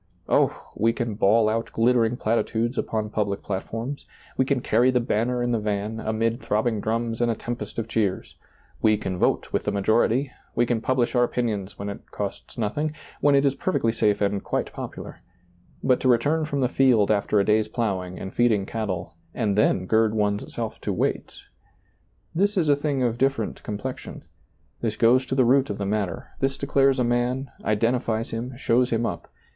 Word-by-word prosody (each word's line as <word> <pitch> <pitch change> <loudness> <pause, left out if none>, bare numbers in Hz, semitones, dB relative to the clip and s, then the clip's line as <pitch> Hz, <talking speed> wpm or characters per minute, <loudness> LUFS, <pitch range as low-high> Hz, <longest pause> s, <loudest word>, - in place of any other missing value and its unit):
Oh - - +4
t - - -10 0.2
we 115 +2 +3
can 120 -3 -2
bawl 105 +2 +3
out 115 +1 -1
glittering 120 0 +2
platitudes 115 +2 0
upon 110 -4 -2
public 100 -2 -1
plat 95 -1 -2
forms; 120 +6 -6 0.3
we 130 - +2
can 135 -1 +1
carry 120 +2 +3
the 125 -1 +3
banner 120 +1 0
in 120 - 0
the 115 - +1
van, 105 +1 -2
amid 115 +2 -1
throbbing 110 0 0
drums 115 +1 -1
and 120 - +2
a 115 - +1
tempest 120 +2 -6
of 115 -1 -2
cheers; 105 -4 -1 0.5
we 110 -1 +4
can 95 -3 -4
vote - - +1
with - - 0
the - - +1
majority; 115 +6 +2 0.2
we 120 - +3
can 115 -2 0
publish 130 -1 +1
our 120 -1 +4
opinions 110 -6 -2
when 100 - -5
it 100 - -8
costs 100 +4 -6
nothing, 145 +8 -1 0.2
when 145 -1 +4
it 140 +1 +4
is 135 - +3
per 185 - -2
fectly 115 -1 +1
safe 105 -2 +1
and 100 -1 0
quite - - -2
popular; - - -7 0.6
but 130 -2 +3
to - - 0
return 145 +7 +2
from 145 -2 -2
the 125 - +3
field 120 -6 +3
after 105 0 +2
a 100 - +2
day's 110 0 +3
plowing 95 -6 -2
and 95 - -7
feeding 110 -5 +2
cattle, 100 -6 -4 0.2
and 105 -5 0
then 95 -3 +2
gird 110 +2 +2
one's 105 -1 0
self - - -5
to - - -2
wait - - -2 0.4
— - - -41
this 200 +5 +1
is 160 -5 +2
a 145 - +6
thing 140 -2 -1
of 120 -1 0
different 135 -5 0
complection; 110 +5 -6 0.6
this 110 -2 -1
goes 125 +3 +4
to 130 - -1
the 130 -2 +4
root 135 +3 +4
of 100 - -3
the 100 - -3
matter; 100 -2 -2
this 135 0 0
declares 135 -1 +2
a 125 - +2
man, 120 +3 0
identifies 115 +1 0
him, 120 +2 -5
shows 125 -1 +2
him 115 0 0
up. - - -4
115 Hz, 195 wpm, -25 LUFS, 105-125 Hz, 0.6 s, a